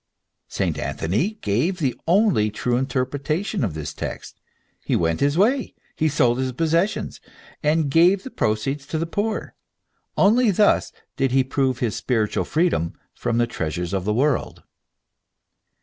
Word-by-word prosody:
St. - - -2
Anthony 110 - -1
gave 125 - 0
the 140 -8 0
only 180 - +3
true 120 +3 -1
interpretation 140 - -1
of 95 -9 -2
this 75 -1 -5
text. - - -7 0.4
He - - 0
went 80 -1 +1
his 145 +2 +1
way, 245 +7 +2 0.2
and 155 -1 +2
sold 120 -3 +2
his 130 -1 -1
possessions, 165 - 0 0.4
and 155 0 +2
gave 180 +5 +4
the 265 - -8
proceeds 135 +7 -1
to 160 - -2
the 165 - -1
poor. 205 +6 -3 0.6
Only 230 +4 +4
thus 205 +1 +3 0.3
did 135 -2 +1
he 135 0 +4
prove 130 -1 -1
his 115 -4 0
spiritual 110 -5 0
freedom 155 - 0 0.2
from 115 - -2
the 120 - +3
treasures 85 -4 -4
of 95 -1 -1
this 105 +1 0
world. 140 +4 0
140 Hz, 150 wpm, -23 LUFS, 115-175 Hz, 0.6 s, gave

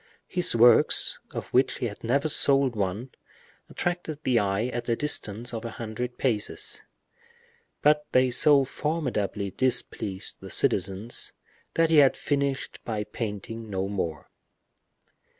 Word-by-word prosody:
His 180 -8 +1
works, 115 0 +5
of - - -6
which 130 +1 +2
he - - -3
had 105 -3 -6
never 140 +6 +1
sold 135 -4 +2
one, 105 +5 -3 0.6
attracted 175 -3 -3
the 125 -2 +2
eye 100 +2 0
at 120 -1 -4
a 115 - +2
distance 120 -4 -2
of 115 0 -5
a 115 - -4
hundred 115 +2 -6
paces; 130 - -1 1.0
but 150 0 +3
they 130 0 +3
so 140 +2 +5
formidably 125 -10 -2
displeased 110 -6 -1
the - - -10
citizens, 100 +5 +1 0.4
that 165 -1 +2
he 160 - +5
had 140 -2 +5
finished 140 -2 -2
by 110 -2 -3
painting 110 +1 -6
no 95 -1 -2
more. 85 -6 -4
120 Hz, 130 wpm, -26 LUFS, 105-140 Hz, 1.0 s, works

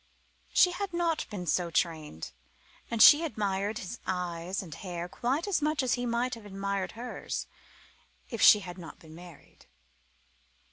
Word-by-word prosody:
She 360 - +5
had 390 +1 -4
not 340 -2 0
been 195 -4 -5
so 175 +1 +1
trained, 155 - -2 0.6
and 230 -2 +5
she 300 +2 +9
admired 205 -6 -2
his 210 +5 -6
eyes 180 +1 -3
and 165 -5 -9
hair 175 -1 -5
quite 265 - -2
as 390 -6 +1
much 300 -1 +1
as 255 - +1
he 245 0 -1
might 240 +2 0
have 230 - -8
admired 195 -1 -3
hers 240 +2 -5 0.8
if 230 - -5
she 210 - +8
had 180 -1 -8
not 165 - -10
been 160 -1 -15
married. 175 -2 -15
200 Hz, 155 wpm, -29 LUFS, 175-250 Hz, 0.8 s, she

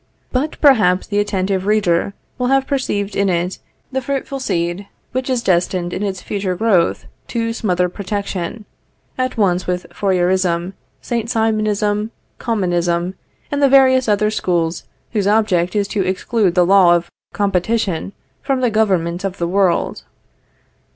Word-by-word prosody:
But 280 +5 -2
perhaps 210 -11 +4
the 205 -1 -1
attentive 195 -2 -1
reader 200 -2 +1 0.2
will 250 - +1
have 270 +1 +3
perceived 210 -8 -2
in 200 -1 +2
it 175 +1 -1 0.3
the 265 0 -1
fruitful 275 +1 -3
seed 175 -4 -2 0.2
which 255 +1 -2
is 250 -2 0
destined 175 -1 0
in - - -3
its 195 -3 -3
future 195 -3 -2
growth 185 -4 +1 0.2
to 230 -1 -2
smother 180 -5 0
Protection, 200 +1 -4 0.5
at 255 -1 -2
once 185 -4 +1
with 180 0 -2
Fourierism, 185 -2 +1 0.3
Saint 235 -2 -3
Simonism, 215 -2 0 0.3
Commonism, 175 -5 0 0.4
and 285 0 -1
the 280 - +5
various 260 -2 +5
other 210 +1 +2
schools 170 -5 -1 0.3
whose 205 -4 0
object 205 -4 +2
is 205 -1 +1
to 200 - 0
exclude 185 +1 0
the 180 -1 +4
law 185 -2 +6
of 170 0 -3 0.2
COMPETITION 200 -1 0 0.3
from 270 -1 -1
the 245 -2 +2
government 185 -5 +1
of 195 -1 -3
the 170 - -1
world. 185 0 0
200 Hz, 145 wpm, -18 LUFS, 180-225 Hz, 0.5 s, law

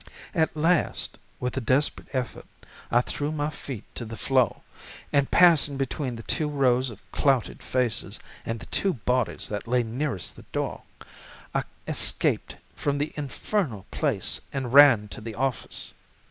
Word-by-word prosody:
At 160 -4 +1
last, 165 +2 +1 0.2
with 125 - -2
a - - +1
desperate 130 +5 +1
effort 130 -2 -3 0.4
I 120 - +4
threw 145 +4 -3
my 150 0 -1
feet 130 -8 -6
to - - -4
the 115 0 -7
floor 130 -5 +2 0.5
and 140 -1 +3
passing 160 -5 +5
between 135 -1 -2
the 115 - -8
two 155 +4 0
rows 130 -3 +2
of 110 -3 -10
clouted 135 -5 +1
faces 125 -3 -1 0.2
and 115 0 -3
the - - -9
two 195 -4 0
bodies 125 +1 0
that 105 +2 -4
lay 125 +1 +2
nearest 120 - -3
the - - -13
door, - - -2 0.7
I - - 0 0.2
escaped - - +1 0.2
from 145 -1 -1
the 145 +2 -2
infernal 145 - -2
place - - +1
and 130 -3 -3
ran 135 -7 +8
to 115 - -8
the 110 0 -6
office. 135 -2 -1
130 Hz, 155 wpm, -26 LUFS, 120-145 Hz, 0.7 s, ran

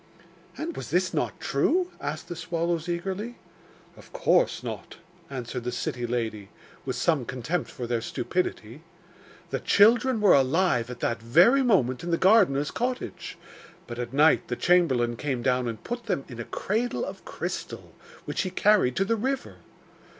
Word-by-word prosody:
'And 335 +1 -4
was - - -6
this 180 +1 +1
not 150 - -2
true?' 350 - +1
asked 155 - -4
the 175 - -5
swallows 170 0 -2
eagerly. 195 +7 -3 0.6
'Of - - -16
course - - +2
not,' - - -6 0.3
answered 125 -2 -5
the 125 - -2
city 120 0 -3
lady, 110 -4 -3 0.4
with - - -1
some 155 -6 +1
contempt 125 +8 -3
for 125 - -6
their 120 -1 -1
stupidity. 120 -1 -3 0.7
'The - - -1
children 225 +4 +4
were 210 -3 +6
alive 135 -3 +2
at 125 -1 -8
that 115 -1 -1
very 175 - +5
moment 155 - +2
in 175 - -4
the 170 - +2
gardener's 180 -9 +4
cottage; 250 +1 -4 0.5
but 120 0 -7
at 120 -1 -4
night 150 +4 +4
the - - -2
chamberlain 130 -10 +2
came 130 -3 -2
down 125 -1 +1
and 115 -2 -5
put 240 -1 -5
them 175 -9 -1
in 120 -2 -10
a 120 - -4
cradle 235 - -2
of - - -8
crystal, - - -6 0.3
which - - -2
he 185 - -2
carried 195 -10 +3
to 195 - +1
the 230 - +1
river. 265 +4 -3
165 Hz, 165 wpm, -26 LUFS, 125-205 Hz, 0.7 s, were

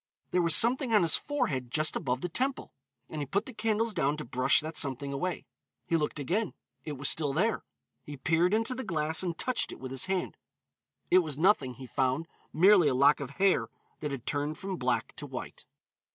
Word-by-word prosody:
There 180 - +2
was 170 -1 +5
something 245 +2 +4
on 210 -4 +5
his 165 - +3
forehead 135 - -2
just 155 +5 0
above 130 -4 -2
the - - -2
temple, 260 +10 -3 0.3
and 155 - -6
he 145 - -4
put 200 - -1
the 260 - -8
candles 225 0 0
down 145 -2 0
to 150 - -6
brush 125 +2 +3
that 155 +1 -6
something 140 0 0
away. 175 +6 -3 0.4
He 170 - 0
looked 150 -1 -1
again, 185 - -2 0.3
it 150 - -5
was 140 0 -3
still 145 -4 +3
there. 215 +9 0 0.4
He 145 -1 -9
peered 165 +6 +2
into 225 +3 +1
the 260 +1 -5
glass 160 -5 -1
and 175 -3 -3
touched 255 -1 -1
it - - -10
with 130 0 -7
his 135 -1 0
hand. 190 -1 -2 0.7
It 185 - +7
was 155 -6 -2
nothing, 150 -8 +2
he 130 - -10
found, 130 +5 -1 0.2
merely 185 0 +5
a 135 - +1
lock 140 +3 +5
of 140 -3 -5
hair 195 0 +2 0.3
that 150 - -3
had 135 -4 -6
turned 145 +1 -2
from 195 -2 -5
black - - -1
to - - -6
white. - - -8
160 Hz, 210 wpm, -29 LUFS, 140-195 Hz, 0.7 s, It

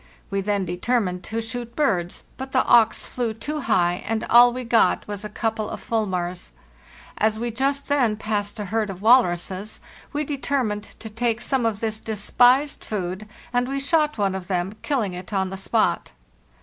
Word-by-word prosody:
We 195 0 0
then 200 -1 0
determined 180 +1 -1
to 225 +1 -3
shoot 235 +1 -6
birds, 185 - 0
but 265 0 -7
the 260 - +3
auks 225 -1 +4
flew 235 -3 -3
too 300 +7 -4
high, 175 -10 +1
and 225 0 -1
all 240 +1 +8
we 250 +1 -4
got 230 -1 +2
was 205 0 -5
a 210 - -5
couple 220 0 -2
of - - -6
fulmars. 185 -5 -2 0.7
As 215 0 +2
we 235 +1 -2
just 275 +4 -1
then 250 -7 +2
passed 210 0 -3
a 210 - -3
herd 215 +1 -1
of 190 0 -7
walruses 200 -4 +2 0.3
we 295 0 -1
determined 265 -7 -1
to 225 - -7
take 230 +1 0
some 250 -1 0
of 215 -2 -3
this 220 -1 -2
despised 245 +7 +2
food, 190 0 -4 0.3
and 245 0 +1
we 275 +1 -2
shot 300 +1 +1
one 200 -2 +1
of 190 -2 -5
them, 185 +1 -1
kill 280 -4 0
ing 195 -3 -3
it 180 +3 -8
on 190 -1 0
the - - -4
spot. 195 - 0
220 Hz, 185 wpm, -23 LUFS, 195-245 Hz, 0.7 s, all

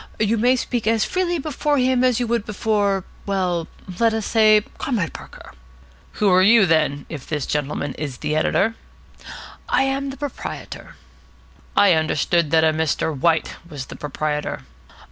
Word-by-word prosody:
You 215 +1 +2
may 250 +3 +4
speak 240 -3 -3
as 225 -1 +2
freely 360 -2 -1
before 295 0 -1
him 255 -1 +2
as 255 -2 +3
you 245 - 0
would 235 -2 0
before 205 -2 0 0.2
well, 180 -4 -1 0.3
let 230 -1 +3
us 220 -2 -2
say 215 -2 +4 0.2
Comrade 210 - -2
Parker." - - -12 0.6
"Who 210 - 0
are 185 0 +5
you, 215 +2 +6
then, 150 -4 +1
if 145 -5 -8
this 150 -3 -2
gentleman 145 -1 -2
is 145 -5 -4
the 150 - -2
editor?" 195 +7 +1 1.0
"I - - +3
am 270 +1 -1
the 270 - -7
proprietor." 285 -1 -7 0.8
"I 200 -3 +6
understood 160 +1 +1
that 160 +1 +4
a 160 -1 +3
Mr. 160 0 -1
White 160 +3 +1
was 145 -4 -6
the - - -10
proprietor." 150 - -3
200 Hz, 160 wpm, -21 LUFS, 155-235 Hz, 1.0 s, you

